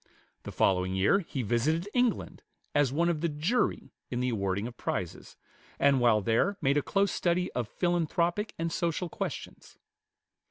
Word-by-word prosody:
The -, -, -7 dB
following 95 Hz, 0 st, +1 dB
year 100 Hz, -, +4 dB
he 145 Hz, -8 st, -4 dB
visited 150 Hz, -, 0 dB
England 245 Hz, -3 st, 0 dB, 0.3 s
as 145 Hz, -3 st, +3 dB
one 165 Hz, +5 st, +1 dB
of 165 Hz, -3 st, 0 dB
the 170 Hz, -, +1 dB
"jury" 160 Hz, +12 st, -1 dB, 0.2 s
in 120 Hz, -, -2 dB
the 125 Hz, 0 st, 0 dB
awarding 100 Hz, -2 st, -1 dB
of 120 Hz, 0 st, -7 dB
prizes; 90 Hz, -7 st, -4 dB, 0.4 s
and 140 Hz, -1 st, +4 dB
while 115 Hz, -3 st, +4 dB
there 115 Hz, -, +1 dB
made 140 Hz, +2 st, +2 dB
a -, -, +3 dB
close 195 Hz, +5 st, +1 dB
study 180 Hz, +1 st, 0 dB
of 120 Hz, -4 st, -3 dB
philanthropic 175 Hz, +3 st, 0 dB
and 165 Hz, 0 st, -2 dB
social 170 Hz, +1 st, -1 dB
questions. -, -, -6 dB
150 Hz, 160 wpm, -29 LUFS, 120-175 Hz, 0.4 s, year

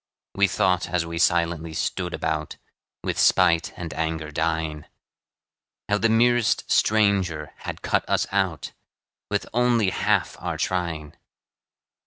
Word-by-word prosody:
We 100 Hz, 0 st, +3 dB
thought, 90 Hz, -2 st, +1 dB
as 85 Hz, -1 st, 0 dB
we 85 Hz, 0 st, -5 dB
silently 85 Hz, -2 st, +1 dB
stood 90 Hz, +1 st, -2 dB
about, 80 Hz, -3 st, -3 dB, 0.5 s
With -, -, -2 dB
spite 85 Hz, 0 st, +4 dB
and 85 Hz, -4 st, -6 dB
anger 80 Hz, 0 st, -3 dB
dying, 80 Hz, -1 st, -2 dB, 1.0 s
How 105 Hz, 0 st, +2 dB
the 115 Hz, -, +2 dB
merest 120 Hz, 0 st, +2 dB
stranger 100 Hz, -8 st, +2 dB
had -, -, -7 dB
cut -, -, 0 dB
us -, -, +2 dB
out, 95 Hz, -6 st, -1 dB, 0.6 s
With 105 Hz, -1 st, -1 dB
only 120 Hz, -4 st, +2 dB
half -, -, 0 dB
our -, -, -3 dB
trying. 85 Hz, -5 st, -2 dB
85 Hz, 125 wpm, -24 LUFS, 80-100 Hz, 1.0 s, spite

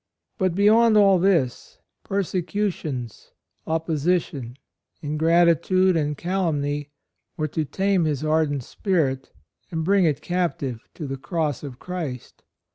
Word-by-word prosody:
But 185 Hz, -3 st, +1 dB
beyond 215 Hz, +3 st, +5 dB
all 195 Hz, -3 st, +6 dB
this, 170 Hz, -10 st, 0 dB, 0.3 s
persecutions, 180 Hz, -, -3 dB, 0.3 s
opposition, 160 Hz, -5 st, -1 dB, 0.5 s
ingratitude 170 Hz, +4 st, +3 dB
and 150 Hz, -2 st, 0 dB
calumny 150 Hz, -6 st, -1 dB, 0.5 s
were 155 Hz, -, -1 dB
to 155 Hz, +2 st, -2 dB
tame 190 Hz, +2 st, +1 dB
his 150 Hz, -2 st, -1 dB
ardent 155 Hz, -3 st, +1 dB
spirit 140 Hz, -, -1 dB, 0.4 s
and 160 Hz, -1 st, -2 dB
bring 195 Hz, 0 st, +4 dB
it 150 Hz, -4 st, +1 dB
cap 175 Hz, -1 st, -1 dB
tive 125 Hz, -6 st, -5 dB
to 155 Hz, -, -6 dB
the 135 Hz, -1 st, -4 dB
Cross 150 Hz, -1 st, -2 dB
of 135 Hz, -4 st, -8 dB
Christ. 160 Hz, -9 st, -6 dB
160 Hz, 120 wpm, -24 LUFS, 145-185 Hz, 0.5 s, all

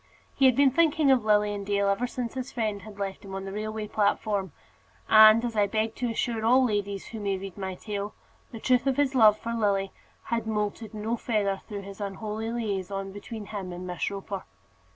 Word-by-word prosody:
He 270 Hz, -, +5 dB
had 255 Hz, -, +4 dB
been 275 Hz, 0 st, +5 dB
thinking 310 Hz, -1 st, +3 dB
of 255 Hz, -4 st, +4 dB
Lilian 210 Hz, -1 st, +2 dB
Dale 200 Hz, 0 st, +1 dB
ever 200 Hz, +5 st, +1 dB
since 245 Hz, -1 st, -4 dB
his 260 Hz, -1 st, -5 dB
friend 215 Hz, -4 st, -2 dB
had 205 Hz, +1 st, -11 dB
left 195 Hz, -1 st, -4 dB
him 195 Hz, -1 st, -7 dB
on 195 Hz, 0 st, -5 dB
the 195 Hz, -, -5 dB
railway 215 Hz, +1 st, -4 dB
platform; 205 Hz, -3 st, 0 dB, 0.6 s
and, 220 Hz, +2 st, +8 dB
as 235 Hz, -2 st, -3 dB
I 205 Hz, -1 st, +3 dB
beg 220 Hz, +2 st, -1 dB
to 245 Hz, -1 st, -1 dB
assure 230 Hz, 0 st, -1 dB
all 255 Hz, +3 st, +5 dB
ladies 205 Hz, -3 st, -2 dB
who 225 Hz, -, -6 dB
may 200 Hz, -2 st, -1 dB
read 195 Hz, -1 st, -8 dB
my 190 Hz, -2 st, -4 dB
tale, 205 Hz, +1 st, -5 dB, 0.4 s
the 225 Hz, -, -7 dB
truth 250 Hz, +3 st, +2 dB
of 270 Hz, -, +1 dB
his 285 Hz, -2 st, +2 dB
love 215 Hz, -4 st, +6 dB
for 230 Hz, +2 st, -4 dB
Lily 200 Hz, -4 st, +1 dB, 0.3 s
had 230 Hz, -1 st, -2 dB
moulted 210 Hz, 0 st, -2 dB
no 220 Hz, +3 st, -2 dB
feather 205 Hz, -4 st, 0 dB
through 205 Hz, -2 st, -6 dB
that 200 Hz, +1 st, -10 dB
unholy 215 Hz, +3 st, -4 dB
liaison 195 Hz, -4 st, -3 dB
between 210 Hz, +2 st, -8 dB
him 200 Hz, -3 st, -6 dB
and 180 Hz, +1 st, -7 dB
Miss 180 Hz, -1 st, -2 dB
Roper. 195 Hz, -1 st, -6 dB
210 Hz, 205 wpm, -27 LUFS, 200-230 Hz, 0.6 s, and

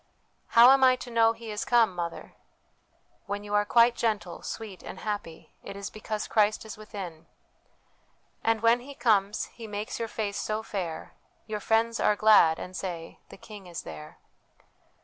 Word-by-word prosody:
' -, -, -43 dB
How 240 Hz, +2 st, +10 dB
am 270 Hz, 0 st, +5 dB
I 255 Hz, -1 st, +6 dB
to 250 Hz, -1 st, -9 dB
know 225 Hz, -1 st, +4 dB
He 230 Hz, -1 st, -9 dB
is 210 Hz, -, -3 dB
come, 230 Hz, -5 st, +3 dB
mother? 170 Hz, -1 st, -5 dB, 0.3 s
' -, -, -42 dB
' -, -, -40 dB
When 205 Hz, +1 st, -4 dB
you 205 Hz, 0 st, -7 dB
are 205 Hz, 0 st, +3 dB
quite 235 Hz, +2 st, +5 dB
gentle, 210 Hz, -6 st, -2 dB
sweet, 215 Hz, -5 st, -7 dB
and 190 Hz, -, -9 dB
happy, 205 Hz, -6 st, -5 dB
it 195 Hz, -, -9 dB
is 200 Hz, 0 st, -6 dB
because 215 Hz, 0 st, -4 dB
Christ 215 Hz, 0 st, +2 dB
is 220 Hz, -, -8 dB
within, 190 Hz, -7 st, -9 dB, 0.6 s
' -, -, -40 dB
"And 225 Hz, -1 st, +1 dB
when 230 Hz, +1 st, +4 dB
He 275 Hz, +3 st, -11 dB
comes, 210 Hz, -4 st, +1 dB
He 230 Hz, -2 st, -9 dB
makes 210 Hz, +1 st, -5 dB
your 230 Hz, -, -2 dB
face 210 Hz, -2 st, -3 dB
so 215 Hz, +1 st, -2 dB
fair, 175 Hz, -7 st, -5 dB, 0.3 s
Your 215 Hz, -1 st, -4 dB
friends 225 Hz, +2 st, +1 dB
are 210 Hz, -, +3 dB
glad, 205 Hz, -7 st, +5 dB
and 185 Hz, -, -8 dB
say, 170 Hz, -4 st, -6 dB
' -, -, -40 dB
The -, -, -12 dB
King 205 Hz, -2 st, -12 dB
is 170 Hz, -1 st, -7 dB
there.' 75 Hz, -1 st, -10 dB
210 Hz, 190 wpm, -27 LUFS, 195-225 Hz, 0.6 s, How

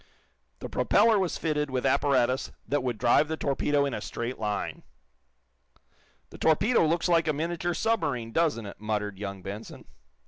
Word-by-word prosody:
The -, -, -4 dB
propeller 220 Hz, 0 st, +3 dB
was 185 Hz, -3 st, -1 dB
fitted 150 Hz, -2 st, -1 dB
with 130 Hz, -1 st, -2 dB
apparatus 130 Hz, -2 st, +2 dB, 0.2 s
that 145 Hz, 0 st, 0 dB
would 125 Hz, -3 st, -2 dB
drive 120 Hz, +6 st, +3 dB
the 160 Hz, +1 st, -3 dB
torpedo 140 Hz, 0 st, +1 dB
in 140 Hz, -, -2 dB
a -, -, -4 dB
straight 120 Hz, +2 st, -5 dB
line. 105 Hz, -1 st, -3 dB, 1.5 s
"The -, -, -12 dB
torpedo 200 Hz, +10 st, +3 dB
looks 170 Hz, +3 st, +1 dB
like 165 Hz, -2 st, +3 dB
a 155 Hz, -, +2 dB
miniature 170 Hz, +3 st, -2 dB
submarine, 145 Hz, -, -1 dB
doesn't 150 Hz, -7 st, +1 dB
it?" 100 Hz, -, -10 dB
muttered 105 Hz, -2 st, -2 dB
young 100 Hz, -2 st, -6 dB
Benson. 100 Hz, +4 st, -8 dB
140 Hz, 160 wpm, -27 LUFS, 115-165 Hz, 1.5 s, propeller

